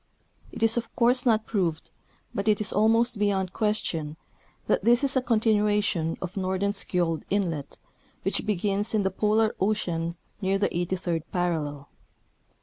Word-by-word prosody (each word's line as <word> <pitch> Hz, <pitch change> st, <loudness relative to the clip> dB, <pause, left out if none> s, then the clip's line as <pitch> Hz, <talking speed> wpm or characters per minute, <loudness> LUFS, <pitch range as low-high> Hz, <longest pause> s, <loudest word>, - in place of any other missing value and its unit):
It -, -, -4 dB
is 225 Hz, +1 st, +4 dB
of 230 Hz, -1 st, -4 dB
course 245 Hz, +1 st, +3 dB
not 220 Hz, -2 st, +3 dB
proved, 175 Hz, -7 st, -2 dB, 0.4 s
but 200 Hz, +2 st, -3 dB
it 210 Hz, -1 st, +3 dB
is 215 Hz, -, +1 dB
ahnost 225 Hz, +1 st, +3 dB
beyond 190 Hz, -3 st, 0 dB
ciuestion, 165 Hz, -8 st, -1 dB, 0.5 s
that -, -, +1 dB
this 240 Hz, +3 st, +4 dB
is 275 Hz, 0 st, +1 dB
a 260 Hz, -, +3 dB
continuation 210 Hz, -7 st, +1 dB
of 185 Hz, 0 st, -6 dB
Nor 190 Hz, -1 st, -1 dB
denskiold 180 Hz, -4 st, 0 dB
inlet, 170 Hz, -8 st, -2 dB, 0.5 s
wdiich -, -, +2 dB
begins 205 Hz, +1 st, +1 dB
in 210 Hz, -, +2 dB
the 190 Hz, -, 0 dB
Polar 215 Hz, +3 st, +2 dB
ocean 170 Hz, -5 st, -1 dB, 0.3 s
near 195 Hz, 0 st, +1 dB
the 200 Hz, -, +1 dB
83d 175 Hz, -1 st, -2 dB
parallel. 155 Hz, -6 st, -2 dB
200 Hz, 145 wpm, -26 LUFS, 175-215 Hz, 0.5 s, is